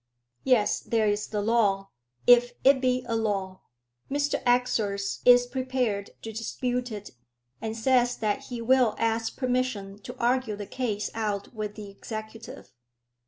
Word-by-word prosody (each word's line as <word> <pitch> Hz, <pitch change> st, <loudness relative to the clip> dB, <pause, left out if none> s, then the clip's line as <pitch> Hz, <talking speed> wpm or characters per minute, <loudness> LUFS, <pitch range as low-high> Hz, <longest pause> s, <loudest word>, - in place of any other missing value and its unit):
"Yes, 245 Hz, -6 st, +3 dB
there 225 Hz, -2 st, 0 dB
is 205 Hz, 0 st, 0 dB
the 210 Hz, -1 st, -2 dB
law, 200 Hz, -3 st, +1 dB, 0.3 s
if 245 Hz, 0 st, +6 dB
it 270 Hz, -1 st, +5 dB
be 255 Hz, -1 st, +1 dB
a 230 Hz, -, -1 dB
law. 195 Hz, -4 st, -2 dB, 0.5 s
Mr 285 Hz, +1 st, 0 dB
Exors 220 Hz, -5 st, +1 dB
is 245 Hz, 0 st, +7 dB
prepared 250 Hz, -5 st, -2 dB
to 225 Hz, -, -5 dB
dispute 245 Hz, +2 st, -2 dB
it, 210 Hz, -1 st, -7 dB, 0.5 s
and 225 Hz, 0 st, -4 dB
says 245 Hz, +1 st, +2 dB
that 215 Hz, +5 st, -1 dB
he 240 Hz, -3 st, -6 dB
will 250 Hz, -2 st, +4 dB
ask 225 Hz, 0 st, -1 dB
permission 250 Hz, -6 st, -1 dB
to 250 Hz, +5 st, -9 dB
argue 245 Hz, -2 st, +1 dB
the 205 Hz, 0 st, -6 dB
case 215 Hz, -3 st, -3 dB
out 210 Hz, -2 st, -3 dB
with 210 Hz, -2 st, -5 dB
the 205 Hz, -2 st, -8 dB
executive." 220 Hz, -, -9 dB
225 Hz, 145 wpm, -27 LUFS, 210-250 Hz, 0.5 s, is